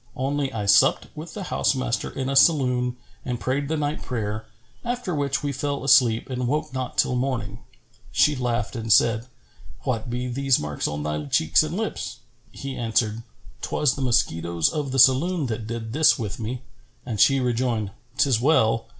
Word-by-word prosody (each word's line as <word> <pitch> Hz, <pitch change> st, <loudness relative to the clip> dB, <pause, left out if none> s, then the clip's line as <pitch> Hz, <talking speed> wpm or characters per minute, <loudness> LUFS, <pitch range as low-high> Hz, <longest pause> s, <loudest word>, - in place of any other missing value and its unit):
Only 140 Hz, +1 st, -1 dB
I 110 Hz, -4 st, -4 dB
supped 100 Hz, -, +4 dB
with 155 Hz, +2 st, -8 dB
the 205 Hz, -, -5 dB
house -, -, +2 dB
master 130 Hz, -2 st, -2 dB
in 130 Hz, -1 st, -4 dB
a 135 Hz, -, -1 dB
saloon 125 Hz, -5 st, +3 dB, 0.3 s
and 125 Hz, -2 st, -3 dB
prayed 140 Hz, +3 st, -1 dB
the 160 Hz, +2 st, -1 dB
night 150 Hz, 0 st, -2 dB
prayer, 110 Hz, -3 st, -4 dB, 0.4 s
after 240 Hz, -6 st, -3 dB
which 140 Hz, -2 st, -1 dB
we 145 Hz, -, -1 dB
fell 140 Hz, +1 st, -3 dB
asleep 120 Hz, -4 st, +4 dB
and 125 Hz, -2 st, -3 dB
woke 150 Hz, +2 st, -2 dB
not 130 Hz, -2 st, -4 dB
till 125 Hz, -, +2 dB
morning." 125 Hz, -5 st, -2 dB, 0.5 s
She 150 Hz, -, +3 dB
laughed 125 Hz, -1 st, -2 dB
and 115 Hz, -1 st, -3 dB
said, 115 Hz, +3 st, +4 dB, 0.5 s
"What 125 Hz, -1 st, -3 dB
be 125 Hz, +1 st, -3 dB
those 135 Hz, +1 st, +2 dB
marks 75 Hz, -1 st, -3 dB
on 75 Hz, 0 st, -4 dB
thy 75 Hz, 0 st, -3 dB
cheeks 80 Hz, +2 st, +3 dB
and 155 Hz, +3 st, -3 dB
lips?" 220 Hz, -, -4 dB, 0.3 s
He 135 Hz, -1 st, -6 dB
answered, 115 Hz, -1 st, 0 dB, 0.4 s
"'Twas 150 Hz, -4 st, +1 dB
the 140 Hz, -, -6 dB
mosquitoes 85 Hz, -9 st, +1 dB
of 145 Hz, -3 st, -3 dB
the 135 Hz, -, -2 dB
saloon 140 Hz, +6 st, +4 dB
that 110 Hz, -2 st, -4 dB
did 115 Hz, -1 st, -5 dB
this 155 Hz, +2 st, +5 dB
with 110 Hz, -4 st, -5 dB
me;" 120 Hz, +3 st, -5 dB, 0.4 s
and 115 Hz, -4 st, -4 dB
she 135 Hz, +5 st, +5 dB
rejoined, 120 Hz, -4 st, -1 dB, 0.3 s
"'Tis 130 Hz, -6 st, +2 dB
well. 115 Hz, -6 st, +2 dB
125 Hz, 175 wpm, -24 LUFS, 115-140 Hz, 0.5 s, this